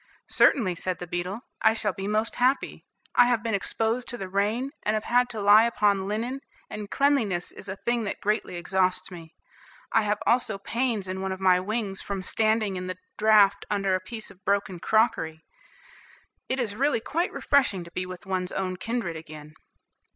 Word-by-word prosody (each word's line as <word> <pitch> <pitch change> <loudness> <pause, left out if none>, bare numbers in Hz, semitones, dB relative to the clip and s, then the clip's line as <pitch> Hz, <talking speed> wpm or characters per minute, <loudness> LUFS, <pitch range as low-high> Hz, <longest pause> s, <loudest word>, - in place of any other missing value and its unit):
"Certainly," 210 -10 +4
said 185 +1 -3
the 180 - -6
beetle, 180 +5 -4 0.2
"I 220 - +4
shall 210 -3 -1
be 195 +3 -5
most 215 +2 0
happy; 255 +3 +1 0.3
I 240 - +6
have 240 -2 +1
been 225 -1 -1
exposed 225 +4 -1
to 240 - -2
the 195 - -5
rain, 210 +8 0
and 215 - 0
have 215 - -1
had 245 +1 +2
to 225 -3 -4
lie 205 +2 +7
upon 205 -4 +1
linen, 235 +6 -3 0.3
and 210 -1 -6
cleanliness 235 -11 +1
is 195 - -10
a 190 - -3
thing 235 +3 -1
that 205 - -4
greatly 210 -3 -1
exhausts 185 +1 0
me; 165 -2 -11 0.6
I 225 - +5
have 210 0 0
also 235 -4 +2
pains 225 0 -2
in 190 +1 -4
one 190 0 -2
of 190 - -4
my 185 -1 +4
wings 200 0 -3
from 195 -2 -4
standing 215 -1 +1
in 180 0 -5
the 185 - -4 0.2
draught 210 -2 +5
under 195 -2 +1
a 185 - +2
piece 220 +4 -7
of 185 - -20
broken 195 -2 0
crockery. 165 -7 +1 1.0
It 260 - 0
is 220 -5 -1
really 280 +1 +2
quite 335 +10 -1
refreshing 255 -11 +2
to 170 - -13
be 185 +1 -3
with 185 +2 -9
one's 185 -1 -2
own 185 -1 -2
kindred 225 -5 -3
again." 155 -1 -10
205 Hz, 190 wpm, -26 LUFS, 185-225 Hz, 1.0 s, lie